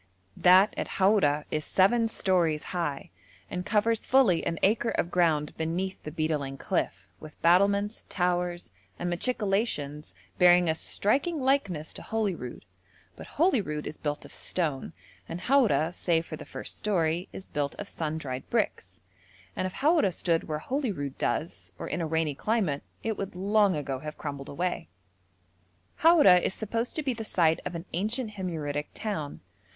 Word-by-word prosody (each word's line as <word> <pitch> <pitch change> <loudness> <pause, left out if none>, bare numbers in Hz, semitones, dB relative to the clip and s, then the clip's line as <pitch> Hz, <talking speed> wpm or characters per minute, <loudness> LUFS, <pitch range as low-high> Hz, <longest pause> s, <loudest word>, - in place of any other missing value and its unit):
That 185 +3 +6
at - - -2
Haura 190 -7 +3
is 155 - -1
seven 225 +8 +3
stories 175 -8 +1
high, 165 - -3 0.4
and 180 0 -3
covers 225 +1 +2
fully 240 -11 +4
an 165 - -2
acre 225 +3 +3
of 175 - -1
ground 160 -4 +2
beneath 175 +4 -2
the - - -6
beetling 150 -3 -2
cliff, - - -2
with 155 -1 -12
battlements, 200 +5 +3
towers, 175 - -1 0.3
and 175 0 -2
machicolations 195 - -1 0.2
bearing 180 0 +6
a 160 - +3
striking 275 - 0
likeness 230 - 0
to - - -9
Holyrood; 195 - -3 0.5
but - - -10
Holyrood 215 - +1
is 155 - -5
built 145 -1 -4
of - - -12
stone, 150 -7 -2 0.4
and 175 - -5
Haura, 185 - +3
save 165 -2 0
for 160 - -6
the - - -10
first - - -4
story, 175 -3 0
is 190 - -9
built 145 -1 -2
of 205 - -7
sun 160 -4 -3
dried 130 -4 -5
bricks, - - -1 0.6
and 185 - -1
if 185 - -8
Haura 300 - +3
stood 165 -1 0
where 155 - -2
Holyrood 190 - -3
does, 165 +3 -2
or - - -6
in 175 - -2
a 165 - -1
rainy 160 -1 0
climate, 185 -4 0 0.2
it 220 -2 -2
would 195 -2 -4
long 200 +1 +3
ago 140 -3 -3
have 150 +2 -7
crumbled 140 -4 -6
away. 175 - -2 1.1
Haura 310 - +7
is 190 - -1
supposed 230 +2 -2
to 310 - -1
be 265 -3 0
the 225 -1 -6
site 165 -6 +2
of 175 - -6
an 165 +1 -5
ancient 215 +6 -1
Himyaritic 155 -7 -3
town. 180 -10 -4
180 Hz, 160 wpm, -28 LUFS, 155-210 Hz, 1.1 s, Haura